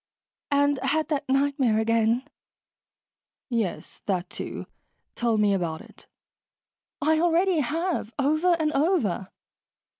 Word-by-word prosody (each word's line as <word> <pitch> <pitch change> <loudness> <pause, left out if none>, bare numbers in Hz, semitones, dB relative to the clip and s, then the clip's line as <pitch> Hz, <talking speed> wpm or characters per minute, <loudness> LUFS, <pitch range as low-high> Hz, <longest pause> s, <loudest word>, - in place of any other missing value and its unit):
"And 285 -1 +2
had 290 +5 0
that 285 -3 -2
nightmare 270 -4 +2
again." 230 +3 +1 1.2
"Yes, 225 -7 -3
that, 185 -2 -1
too. - - -5 0.5
Tell 235 -2 0
me 210 -1 +3
about 170 -4 -2
it." - - -15 1.0
"I 315 +1 +3
already 345 +1 +3
have. 320 - -1
Over 310 +5 +2
and 305 -1 +1
over." 275 - +1
275 Hz, 110 wpm, -26 LUFS, 220-315 Hz, 1.2 s, me